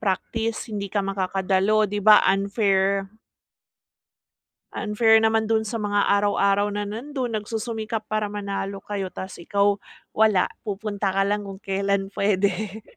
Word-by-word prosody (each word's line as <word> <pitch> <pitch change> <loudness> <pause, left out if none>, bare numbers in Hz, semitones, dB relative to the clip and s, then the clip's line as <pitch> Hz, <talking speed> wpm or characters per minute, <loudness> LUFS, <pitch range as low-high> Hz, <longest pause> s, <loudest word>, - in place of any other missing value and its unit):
praktis 220 +3 -2
hindi 200 -2 -4
ka 200 +1 -1
makakadalo, 195 +2 +1
'di 205 +1 -3
ba 210 +1 +7
unfair. 195 -1 +1 1.7
Unfair 220 +1 +3
naman 220 0 +2
dun 220 0 +2
sa 230 +2 -4
mga 205 -1 +1
araw-araw 200 0 +2
na 205 - -2
nandun, 245 +5 -4
nagsusumikap 220 0 -4
para 215 -1 0
manalo 200 -1 -4
kayo 200 -2 -4
ta's 190 0 -7
ikaw, 200 +3 +1 0.3
wala 215 -4 +3 0.2
pupunta 205 -1 -2
ka 195 - +3
lang 205 +1 -1
kung 195 0 -9
kelan 195 0 -1
puwede. 200 +1 -1
205 Hz, 130 wpm, -24 LUFS, 195-215 Hz, 1.7 s, ba